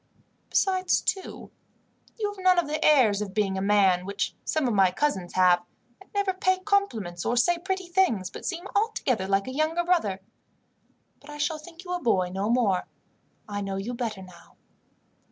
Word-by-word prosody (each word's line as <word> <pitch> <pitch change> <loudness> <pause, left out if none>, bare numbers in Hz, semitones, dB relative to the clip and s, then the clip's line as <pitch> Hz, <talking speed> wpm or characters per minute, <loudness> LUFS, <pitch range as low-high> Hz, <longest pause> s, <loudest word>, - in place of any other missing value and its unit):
Besides, 375 -2 +2
too, 380 -2 -4 0.7
you 420 -2 -1
have 380 -2 -11
none 370 -1 +5
of 345 - +3
the 300 +1 -3
airs 240 -9 +4
of 195 -2 -5
being 200 -3 +1
a 190 - -2
man, 195 -3 +3
which 200 +2 -3
some 310 -4 0
of 240 - 0
my 195 -2 +5
cousins 190 -4 -2
have; 180 -1 +4 0.4
and - - -17
never 405 -2 0
pay 375 0 +1
compliments 235 - -1
or 245 - 0
say 345 +8 +3
pretty 380 +1 -3
things, 345 - +1
but - - -9
seem 350 0 -4
altogether 340 - 0
like 195 0 +1
a 260 - -5
younger 315 +4 0
brother. 335 - +1 1.0
But 285 - -16
I 295 - -8
shall 300 +1 -1
think 330 +3 -12
you 360 -1 -5
a 355 - -2
boy 185 -7 +1
no 195 +3 -1
more. 225 -7 +1 0.6
I 205 -1 -4
know 195 -1 -3
you 200 +6 -4
better 225 -5 -4
now." 180 -1 -16
250 Hz, 185 wpm, -26 LUFS, -, 1.0 s, none